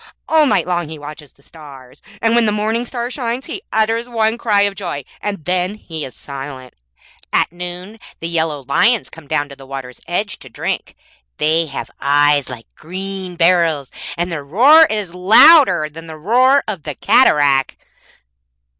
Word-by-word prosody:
All 315 -2 +4
night - - +2
long 175 -3 -2
he 160 - -8
watches 150 0 -11
the 140 - -27
stars, 140 -5 -14 0.2
and 225 0 +3
when 235 -1 +3
the - - +2
morning 220 +3 -1
star 240 0 -4
shines 245 0 -4
he 360 +4 -7
utters 225 +2 0
one 225 -1 0
cry 215 -4 +1
of 200 0 +1
joy, 175 -8 -5 0.2
and 200 -6 -5
then 180 +2 -1
he 160 -7 -7
is 130 - -8
silent. 135 -2 -9 0.6
At - - +2
noon 180 +4 -8 0.2
the 165 - -4
yellow 160 -4 -2
lions 230 - +2
come 165 -3 -13
down 145 0 -1
to 140 - -10
the 135 -1 -15
water's 135 -2 -8
edge 190 +3 -3
to 130 - -13
drink. - - -4 0.4
They 160 +2 +1
have 140 - -7
eyes 145 0 +2
like 120 -3 -9
green 190 +1 -7
beryls, 165 -5 +2 0.3
and 175 +1 -2
their 155 -4 -4
roar 270 - +6
is 205 -5 -4
louder 190 - +6
than 165 +2 -12
the 160 -1 -9
roar 255 - +3
of 200 -6 -4
the 150 -2 -6
cataract.' 140 - +3
175 Hz, 170 wpm, -17 LUFS, 145-220 Hz, 0.6 s, roar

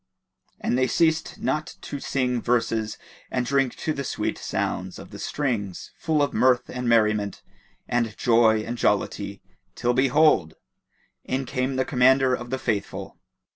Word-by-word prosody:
And 125 - 0
they 130 - +3
ceased 160 +5 +1
not 155 +1 -2
to 145 - -6
sing 125 -3 -1
verses 115 -2 0 0.3
and 125 -1 -1
drink 135 -1 +1
to 155 - -2
the 140 - -4
sweet - - -2
sound - - -3
of - - -11
the - - -9
strings, 115 -10 -3
full 155 -3 +1
of 145 - -1
mirth 125 +2 +3
and 125 -1 -2
merriment 105 -3 +2 0.4
and 115 -3 -1
joy 115 -2 +4
and 120 +2 -5
jollity - - 0 0.3
till 120 0 +1
behold! 135 - +3 0.7
in 135 +1 -2
came 130 +2 -1
the 130 0 +1
Commander 130 0 +4
of 120 -1 -3
the 130 - -1
Faithful. 105 -6 -3
125 Hz, 150 wpm, -25 LUFS, 115-135 Hz, 0.7 s, joy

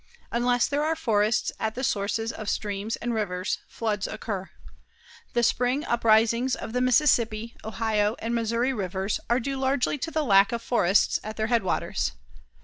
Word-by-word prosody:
Unless 245 +1 +2
there 285 +1 0
are 320 +1 +1
forests 220 -5 +1
at 220 0 -2
the 255 - -4
sources 225 0 -1
of 215 -2 -5
streams 205 +1 -2
and 240 0 -3
rivers, 185 -4 -2
floods 210 -3 -2
occur. 200 -3 -5 0.8
The 240 - +2
spring 250 +5 +1
uprisings 230 +2 +3
of 220 - -7
the 250 - +1
Mississippi, 235 -4 +2
Ohio 215 0 0
and 230 +1 -3
Missouri 235 +3 0
Rivers 190 -2 -2
are 240 +2 +3
due 275 +2 -3
largely 265 +2 0
to 325 - -3
the 315 -1 -1
lack 200 -3 +5
of 235 -1 -3
forests 200 -6 +2
at 215 +1 -7
their 220 0 0
headwaters. 200 - 0
230 Hz, 160 wpm, -26 LUFS, 210-245 Hz, 0.8 s, lack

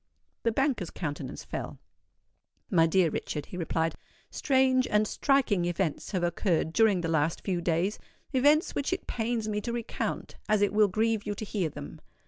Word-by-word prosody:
The 230 - +1
banker's 250 - 0
countenance 145 -5 -5
fell. - - -5 0.9
"My 165 -1 +5
dear 170 -1 +3
Richard," 150 -1 -3
he - - -10
replied, 165 -1 0 0.4
"strange 260 -2 +3
and 210 0 +2
striking 245 -11 +2
events 175 -2 -1
have 185 -4 -1
occurred 170 -2 0
during 215 -4 +4
the 165 - -2
last 160 0 +1
few 180 -3 -1
days,—events 250 - +1
which 285 +5 -1
it 370 - -4
pains 225 -1 -2
me 210 -1 -1
to 235 - -3
recount, 235 -1 -4
as 210 -1 +3
it 205 - +1
will 210 0 +5
grieve 220 +2 0
you 205 - -2
to 215 - -5
hear 195 -6 -1
them. 75 - -9
205 Hz, 165 wpm, -29 LUFS, 170-230 Hz, 0.9 s, My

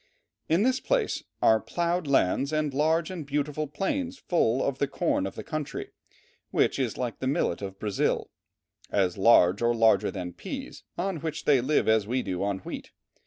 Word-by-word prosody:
In 165 +6 +3
this 260 +1 +2
place - - 0 0.2
are 110 0 +6
"ploughed 170 +2 -1
lands 135 +1 +2
and 155 -2 0
large 160 +4 +1
and 175 -4 -5
beautiful 150 +1 -2
plains 255 - -2
full 135 -8 +1
of 135 -1 -1
the 140 - +1
corn 150 - 0
of - - -8
the - - -6
country, 155 -2 -5 0.6
which - - +1
is 125 -5 -1
like 120 -3 -3
the 130 - -2
millet 130 -9 0
of 95 -1 -6
Brazil, 105 -1 -1 0.6
as 95 -3 +1
large 95 -2 +5
or 120 0 +2
larger 110 -4 +4
than 90 -3 -5
peas, - - -7 0.2
on 185 0 -1
which 155 0 -5
they 140 -4 +5
live 145 +5 +1
as 110 -2 +3
we 125 +2 0
do 90 -1 -3
on 100 -1 0
wheat. - - -6
140 Hz, 180 wpm, -27 LUFS, 110-160 Hz, 0.6 s, are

